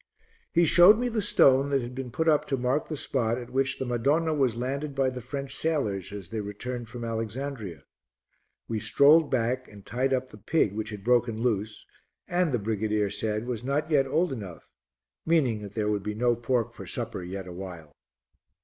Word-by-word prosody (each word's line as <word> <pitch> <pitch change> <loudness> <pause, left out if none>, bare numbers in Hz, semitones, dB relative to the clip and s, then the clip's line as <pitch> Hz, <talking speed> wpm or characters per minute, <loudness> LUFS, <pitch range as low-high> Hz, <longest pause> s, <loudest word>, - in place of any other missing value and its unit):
He 170 - +4
showed 175 +6 +7
me 245 +1 0
the 225 -2 -1
stone 140 -8 +4
that 135 -3 +1
had 120 +1 -6
been 130 -1 -5
put 160 +7 -2
up 150 -2 +4
to 135 - -1
mark 130 +4 0
the 155 - -4
spot 120 -4 0
at 120 -1 -8
which 135 0 +1
the 130 - -3
Madonna 140 +7 +1
was 135 -6 +1
landed 140 +4 -3
by 135 -1 +2
the 125 0 -6
French 135 +2 -5
sailors 110 - -1
as 100 -3 -8
they 110 - -2
returned 115 +4 -6
from 120 0 -7
Alexandria. 115 - -4 0.8
We 110 -1 -2
strolled 145 +7 +5
back 130 +1 0
and 100 -2 -14
tied 130 +2 -1
up 130 0 -1
the 105 - -12
pig 110 -2 +1
which 110 0 -4
had 105 -2 -8
broken 120 -1 +2
loose 110 -3 -1 0.4
and, 175 -2 +1
the 125 - +2
brigadier 105 -1 -1
said, 105 +1 -2
was 120 -2 -4
not 145 +4 -1
yet 135 -3 +4
old 160 +2 +1
enough, 100 -9 -9 0.5
meaning 135 -10 +2
that 100 -1 -9
there 105 -1 0
would 105 -1 -1
be 105 +1 -4
no 120 +2 +2
pork 120 0 -1
for - - -10
supper 115 -5 -3
yet 95 +1 -6
awhile. 90 -4 -8
125 Hz, 195 wpm, -27 LUFS, 105-140 Hz, 0.8 s, showed